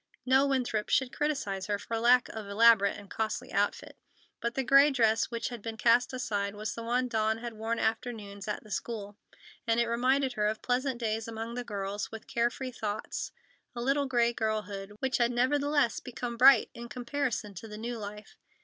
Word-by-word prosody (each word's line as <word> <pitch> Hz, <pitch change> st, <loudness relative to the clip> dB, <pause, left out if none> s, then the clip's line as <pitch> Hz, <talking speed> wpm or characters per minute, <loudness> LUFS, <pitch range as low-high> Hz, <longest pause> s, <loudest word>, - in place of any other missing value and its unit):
No 265 Hz, +2 st, +4 dB
Winthrop 245 Hz, -6 st, 0 dB
should 265 Hz, 0 st, +1 dB
criticise 220 Hz, -11 st, -1 dB
her 205 Hz, -1 st, 0 dB
for 230 Hz, +3 st, -5 dB
lack 245 Hz, +1 st, +5 dB
of 220 Hz, -2 st, -7 dB
elaborate 200 Hz, -1 st, +5 dB
and 205 Hz, -, -11 dB
costly 220 Hz, +5 st, -3 dB
outfit. 205 Hz, 0 st, -1 dB, 0.4 s
But 235 Hz, 0 st, -2 dB
the 270 Hz, -, 0 dB
gray 275 Hz, +4 st, +7 dB
dress 225 Hz, -5 st, +3 dB
which 235 Hz, -1 st, -3 dB
had 240 Hz, -3 st, -7 dB
been 225 Hz, +1 st, -6 dB
cast 235 Hz, +2 st, +4 dB
aside 205 Hz, -5 st, -2 dB
was 210 Hz, 0 st, -4 dB
the 230 Hz, -, -6 dB
one 245 Hz, +2 st, 0 dB
Dawn 220 Hz, -1 st, +1 dB
had 235 Hz, 0 st, -6 dB
worn 225 Hz, +2 st, -2 dB
afternoons 220 Hz, -3 st, -3 dB
at 210 Hz, -, -3 dB
the 215 Hz, -, -14 dB
school, 205 Hz, -2 st, -4 dB, 0.5 s
and 230 Hz, 0 st, +3 dB
it 235 Hz, -, +3 dB
reminded 255 Hz, +3 st, +2 dB
her 210 Hz, -2 st, +1 dB
of 215 Hz, +1 st, -3 dB
pleasant 255 Hz, 0 st, 0 dB
days 225 Hz, -1 st, -2 dB
among 225 Hz, +1 st, -5 dB
the 245 Hz, 0 st, -3 dB
girls, 205 Hz, -2 st, -4 dB
with 225 Hz, -1 st, -8 dB
care 235 Hz, 0 st, +1 dB
free 255 Hz, +1 st, -6 dB
thoughts—a 220 Hz, +2 st, -6 dB
little 275 Hz, +2 st, +1 dB
gray 240 Hz, -2 st, +2 dB
girlhood, 210 Hz, -3 st, -3 dB
which 265 Hz, -1 st, +1 dB
had 240 Hz, 0 st, +3 dB
nevertheless 285 Hz, +1 st, +2 dB
become 245 Hz, -1 st, -5 dB
bright 255 Hz, 0 st, +7 dB
in 235 Hz, 0 st, -9 dB
comparison 245 Hz, -4 st, -3 dB
to 195 Hz, +4 st, -9 dB
the 210 Hz, -1 st, -8 dB
new 235 Hz, +1 st, -4 dB
life. 210 Hz, 0 st, -8 dB
230 Hz, 190 wpm, -30 LUFS, 215-250 Hz, 0.5 s, gray